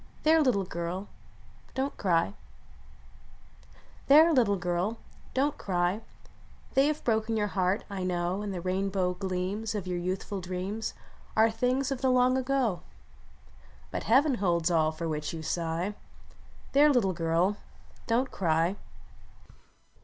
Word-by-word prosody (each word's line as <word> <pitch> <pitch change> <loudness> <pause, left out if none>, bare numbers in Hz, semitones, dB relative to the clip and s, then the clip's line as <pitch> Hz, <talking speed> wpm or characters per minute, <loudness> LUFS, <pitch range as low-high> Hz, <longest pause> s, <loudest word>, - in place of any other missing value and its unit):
There! 320 +1 +5
little 245 -9 +2
girl; 180 +2 -4 0.7
don 270 +2 0
t - - -25
cry! 165 - +2 1.7
There! 315 +4 +7
little 230 -7 +3
girl; 180 +4 -1 0.4
don 280 +3 +2
t - - -21
cry! 180 +2 0 0.7
They 270 +2 +4
have 305 0 -2
broken 220 -1 +1
your 210 -1 0
heart. 185 +2 0
I 200 -2 -5
know; 180 +1 -1
And 205 -1 -4
the 180 -2 -4
rainbow 185 0 0
gleams 190 +4 -3
Of 200 -3 -3
your 180 -1 -2
youthful 185 +2 -3
dreams 185 +5 -4 0.4
Are 220 +1 +5
things 250 +4 0
of 270 - -3
the 265 - +2
long 255 0 +4
ago; 260 -7 0 1.1
But - - -4
Heaven 275 +5 +4
holds 170 -2 +2
all 160 -2 +3
for 165 +1 -5
which 150 0 -3
you 160 - -6
sigh. 170 +4 -2 0.8
There! 290 +2 +6
little 215 -8 +2
girl; 170 +4 +1 0.5
don 235 +3 +2
t - - -17
cry! 170 +2 +1
195 Hz, 140 wpm, -29 LUFS, 175-245 Hz, 1.7 s, There